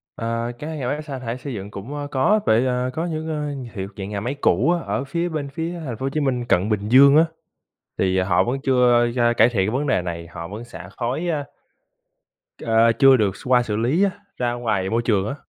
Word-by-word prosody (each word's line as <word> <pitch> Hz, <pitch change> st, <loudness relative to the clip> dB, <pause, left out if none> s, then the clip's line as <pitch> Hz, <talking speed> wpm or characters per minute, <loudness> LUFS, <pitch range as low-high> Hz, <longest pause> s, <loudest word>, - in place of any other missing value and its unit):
Ơ, 115 Hz, +1 st, -2 dB
các 160 Hz, +2 st, -5 dB
nhà 135 Hz, -5 st, -3 dB
máy 145 Hz, +4 st, -2 dB
xả 140 Hz, -4 st, -6 dB
thải 120 Hz, -1 st, -4 dB
xây 135 Hz, +1 st, -7 dB
dựng 100 Hz, -2 st, -7 dB
cũng, 105 Hz, +9 st, -7 dB
ơ, 145 Hz, -1 st, -4 dB
có 145 Hz, +11 st, +3 dB
vậy, 115 Hz, +4 st, +3 dB
ờ, 125 Hz, 0 st, 0 dB
có 160 Hz, +5 st, -2 dB
những, 160 Hz, -2 st, -4 dB
ơ, 150 Hz, -2 st, -2 dB, 0.2 s
hiệu 95 Hz, -3 st, -4 dB
dạng 95 Hz, -1 st, -5 dB
nhà 105 Hz, -1 st, -3 dB
máy 120 Hz, +7 st, -3 dB
cũ 120 Hz, -, +3 dB
á, 175 Hz, -, +1 dB
ở -, -, -2 dB
phía 170 Hz, +5 st, -2 dB
bên 150 Hz, -4 st, -4 dB
phía 165 Hz, +4 st, -4 dB
Thành 120 Hz, -5 st, -5 dB
phố 130 Hz, -, -4 dB
Hồ -, -, 0 dB
Chí 155 Hz, -, -2 dB
Minh 130 Hz, -4 st, -1 dB
cận 100 Hz, -3 st, +1 dB
Bình 105 Hz, -1 st, -1 dB
Dương 140 Hz, +3 st, +7 dB
á, 160 Hz, -, +6 dB, 0.7 s
thì 95 Hz, 0 st, +1 dB
họ 95 Hz, -1 st, +2 dB
vẫn 125 Hz, +3 st, -2 dB
chưa 125 Hz, -3 st, +4 dB
da 120 Hz, -1 st, +3 dB
cải 115 Hz, 0 st, +5 dB
thiện 105 Hz, -3 st, 0 dB
vấn 140 Hz, +5 st, -1 dB
đề 130 Hz, -9 st, +2 dB
này, 85 Hz, -1 st, -6 dB
họ 85 Hz, 0 st, -8 dB
vẫn 105 Hz, +6 st, -7 dB
xả 90 Hz, -6 st, -10 dB
khói, 130 Hz, +8 st, -2 dB
a 150 Hz, -4 st, -1 dB, 1.2 s
à, 115 Hz, 0 st, +4 dB
chưa 135 Hz, -1 st, +7 dB
được 100 Hz, -4 st, 0 dB
x -, -, -13 dB
qua 125 Hz, -1 st, +4 dB
xử 105 Hz, -3 st, -3 dB
lý 125 Hz, -, +1 dB
á, 200 Hz, -, +2 dB, 0.3 s
ra 120 Hz, -1 st, 0 dB
ngoài 110 Hz, -6 st, -1 dB
môi 115 Hz, +3 st, +1 dB
trường 105 Hz, -4 st, +1 dB
á. 140 Hz, -, -3 dB
125 Hz, 245 wpm, -22 LUFS, 105-140 Hz, 1.2 s, Dương